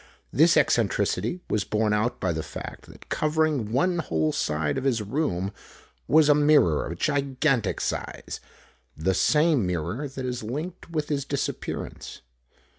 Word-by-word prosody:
This 160 +5 +5
eccentricity 130 - +1
was 105 - 0
borne 105 0 0
out 105 +4 0
by 95 - 0
the 80 - -2
fact - - -8
that - - -15
covering 155 -7 +1
one 175 +8 +2
whole 80 - 0
side 75 - -1
of - - -7
his 130 -4 +2
room 105 - -1 0.6
was 155 -1 +5
a 150 - +7
mirror 145 - +4
of 85 - -6
gigantic 135 - +1
size - - -4 0.6
the 90 +5 +1
same 150 - +3
mirror 90 - -2
that 135 -1 -6
is 125 -1 -3
linked 155 +12 -5
with 155 -3 -2
his 140 -2 0
disappearance. 140 0 -4
130 Hz, 145 wpm, -26 LUFS, 100-150 Hz, 0.6 s, a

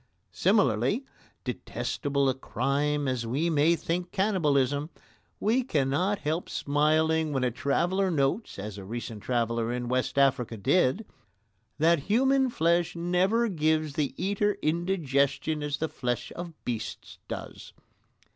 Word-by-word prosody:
Similarly, 190 - +2 0.4
detestable 140 -1 -2
a 130 - +3
crime 145 +2 -1
as 125 -3 -1
we 150 +8 0
may 155 +2 +4
think 175 +2 -3
cannibalism, 150 -8 +1 0.5
we 230 +5 +2
cannot 160 - +1
help 155 +1 -2
smiling 155 +2 +1
when 135 -2 0
a 125 - +1
traveller 175 +10 +1
notes, 150 +7 0
as 100 0 -6
a - - -8
recent 115 +1 -6
traveller 115 -1 0
in 120 0 -3
West 130 +2 -1
Africa 130 -4 +2
did, 140 - +2 0.7
that 165 +2 +4
human 265 +4 +3
flesh 170 -4 +1
never 180 +7 +2
gives 155 -5 +1
the 145 -2 -1
eater 205 +2 0
indigestion 155 -3 0
as 145 -1 -2
the 160 - -1
flesh 125 -5 -3
of 170 -2 -7
beasts 115 -3 -5
does. - - -7
150 Hz, 130 wpm, -28 LUFS, 130-175 Hz, 0.7 s, may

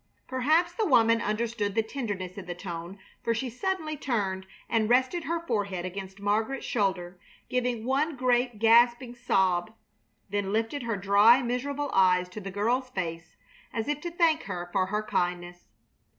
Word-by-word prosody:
Perhaps 310 +7 +2
the 435 +4 0
woman 230 -4 +4
understood 215 -2 -2
the 225 - +2
tenderness 205 -7 -5
in 200 - -8
the 175 - -4
tone, 175 +1 -7 0.3
for 230 - +1
she 245 +2 -3
suddenly 315 - -2
turned 195 -9 -2 0.2
and 225 -2 +1
rested 260 +7 +2
her 335 +1 -2
forehead 200 - -2
against 190 +1 -7
Margaret's 220 +6 -1
shoulder, 185 -4 -1 0.3
giving 245 -3 -1
one 280 +4 +1
great, 245 -2 +1
gasping 235 +2 +4
sob, 190 -6 +1 0.6
then 200 -1 -1
lifted 225 +6 -1
her 230 -3 -2
dry, 205 +6 +5
miserable 280 +4 -2
eyes 180 -1 +4
to 210 +4 -8
the 195 - -6
girl's 235 +7 0
face 165 -6 -5 0.3
as 225 0 -3
if 295 0 -2
to 345 - -4
thank 335 -2 +2
her 175 0 -5
for 185 -1 +2
her 210 +2 -1
kindness. 175 - -2
225 Hz, 160 wpm, -28 LUFS, 190-255 Hz, 0.6 s, dry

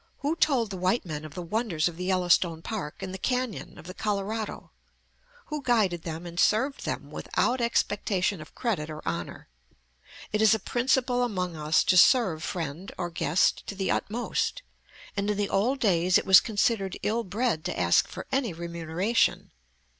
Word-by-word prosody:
Who 295 +3 0
told 255 -10 +2
the 190 - -4
white 185 +5 +1
men 155 -3 -5
of 155 - -10
the 180 - -5
wonders 175 -4 0
of 175 - -5
the 180 +2 -5
Yellowstone 175 -3 +2
Park 200 -4 -5
and 190 -1 -5
the 190 - -6
canyon 250 -2 -2
of - - -12
the 185 - -7
Colorado? 210 +2 -3 0.7
Who 300 -1 -4
guided 215 -10 +1
them 165 +1 -6
and 170 0 -6
served 265 +6 +2
them - - -4
without 250 0 0
expectation 205 -5 0
of 155 - -13
credit 195 -11 -2
or 155 0 -8
honor? 85 0 -4 0.9
It 210 - +1
is 220 0 +6
a - - -3
principle 250 +2 +1
among 185 -8 -1
us 155 +1 +2
to 185 - +3
serve 185 - +5
friend 165 +1 -4
or 175 -2 -3
guest 165 +1 +1
to 200 - -5
the 195 -1 -1
utmost, 245 - -2 0.5
and 200 0 -1
in 210 - 0
the 205 -1 -1
old 250 +8 +1
days 185 -5 +3
it - - -2
was 190 0 +8
considered 205 -3 0
ill 230 +2 0
bred 205 -4 -1
to - - -3
ask 85 -1 +3
for - - -8
any 260 -8 0
remuneration. 170 +5 -1
195 Hz, 175 wpm, -27 LUFS, 170-230 Hz, 0.9 s, was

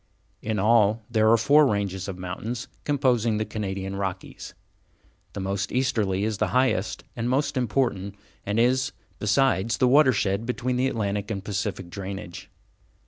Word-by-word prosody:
In 110 -1 -2
all, 110 +1 +3
there 110 -1 +3
are 115 - +6
four 145 +6 +5
ranges 100 -3 -2
of 95 -2 -5
mountains 110 +7 -5 0.2
composing 125 -6 +2
the 110 - -1
Canadian 95 -2 -4
Rockies. 95 -1 -5 0.8
The - - -5
most 100 +1 -2
easterly 105 -7 0
is 105 -1 -2
the - - +2
highest 110 -6 +1
and 120 0 -2
most 140 +3 0
important, 115 -5 -1 0.3
and 105 +3 -1
is, 130 +2 +2 0.3
besides, 115 -1 +2
the 130 - +3
watershed 115 -6 +3
between 125 0 -1
the 130 +1 +2
Atlantic 105 -4 -2
and 100 -3 -3
Pacific 100 -3 -3
drainage. 95 -2 -7
110 Hz, 145 wpm, -25 LUFS, 100-125 Hz, 0.8 s, are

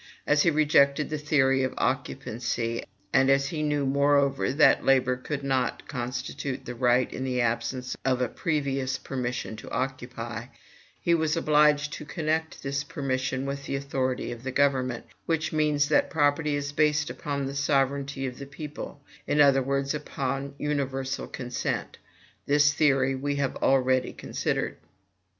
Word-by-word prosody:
As 150 0 +4
he 170 - +4
rejected 150 -1 +3
the 155 - -2
theory 135 -3 +3
of 130 -1 -1
occupancy, 120 -3 -2 0.3
and 135 +1 +5
as 135 0 +3
he 155 - -3
knew, 145 -2 0
moreover, 140 0 +2
that 145 +3 +5
labor 130 -1 +3
could 140 +3 -5
not 130 -2 -1
constitute 130 +1 -4
the 125 - -5
right 125 +1 +2
in 130 - -4
the 130 -1 -1
absence 125 +2 -1
of 130 -1 +1
a 125 - +1
previous 135 -3 -1
permission 125 -4 -4
to - - -9
occupy, 120 -3 -4 0.5
he 170 - +2
was 160 -1 +1
obliged 150 -2 +3
to - - -6
connect 160 +1 -2
this 140 +1 -1
permission 130 -2 -2
with 140 0 -4
the - - -2
authority 135 -2 -2
of 120 -1 -7
the 130 - -4
government, 130 -3 +1 0.2
which 160 -1 0
means 150 -2 +2
that 150 - +3
property 150 -1 +2
is 145 0 -3
based 150 0 +2
upon 140 -2 -3
the 135 - -4
sovereignty 140 -1 0
of 125 0 -5
the 140 - -7
people; 145 0 -8 0.2
in 150 - +1
other 140 -2 +6
words, 140 +1 0
upon 135 -1 -3
universal 135 -2 -2
consent. 125 -2 -4 0.5
This 145 +1 +4
theory 135 -3 +3
we 140 +2 -2
have 140 -2 -1
already 130 -1 +2
considered. - - -2
140 Hz, 155 wpm, -27 LUFS, 130-145 Hz, 0.5 s, other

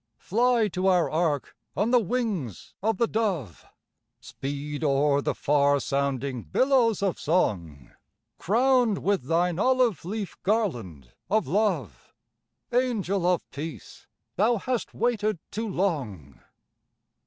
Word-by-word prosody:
Fly 235 +1 +2
to 185 +1 -1
our 180 -3 +3
ark 155 -3 -1 0.2
on 210 +5 +1
the 250 - +6
wings 205 - -3
of 220 0 0
the 235 - +3
dove, 190 - -2 0.6
Speed 145 +2 -5
o'er 140 0 +2
the - - -1
far 145 0 +2
sounding 140 -2 -2
billows 230 - +2
of 195 -3 0
song, 85 - -1 0.5
Crowned 240 +1 +2
with 200 -8 +1
thine 170 +3 +1
olive 255 -4 +2
leaf 200 +2 -5
garland 120 - -2 0.2
of 215 -1 +2
love, 160 - -1 0.6
Angel 210 -7 0
of 180 -2 +1
Peace, 155 +3 -8 0.3
thou 225 +5 +3
hast 245 +3 -3
waited 215 -3 0
too 225 +1 -3
long! 130 - -3
180 Hz, 120 wpm, -26 LUFS, 140-220 Hz, 0.6 s, the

